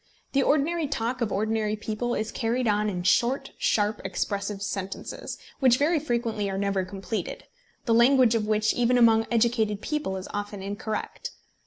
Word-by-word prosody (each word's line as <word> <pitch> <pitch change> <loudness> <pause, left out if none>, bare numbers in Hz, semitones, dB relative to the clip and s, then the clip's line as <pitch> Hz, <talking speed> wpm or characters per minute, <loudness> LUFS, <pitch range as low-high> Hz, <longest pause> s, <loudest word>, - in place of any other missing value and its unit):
The 275 - +3
ordinary 305 +3 +1
talk 250 -2 -2
of 220 -3 0
ordinary 215 +1 0
people 220 +3 -3
is 215 0 -2
carried 240 +1 -1
on 210 0 +2
in 180 -3 -3
short 240 +8 +2
sharp 210 0 +1
expressive 200 0 -3
sentences, 195 -1 -5 0.2
which 255 -2 +5
very 310 +4 +2
frequently 235 -7 -1
are 195 - -3
never 200 -1 0
completed, 195 +1 -5 0.4
the 230 - +2
language 245 0 +5
of 220 -2 0
which 215 0 +2
even 245 +1 +2
among 225 -2 +5
educated 225 -3 +1
people 295 -8 -2
is 185 - -7
often 205 -1 -4
incorrect. 205 +2 -4
220 Hz, 160 wpm, -26 LUFS, 205-245 Hz, 0.4 s, which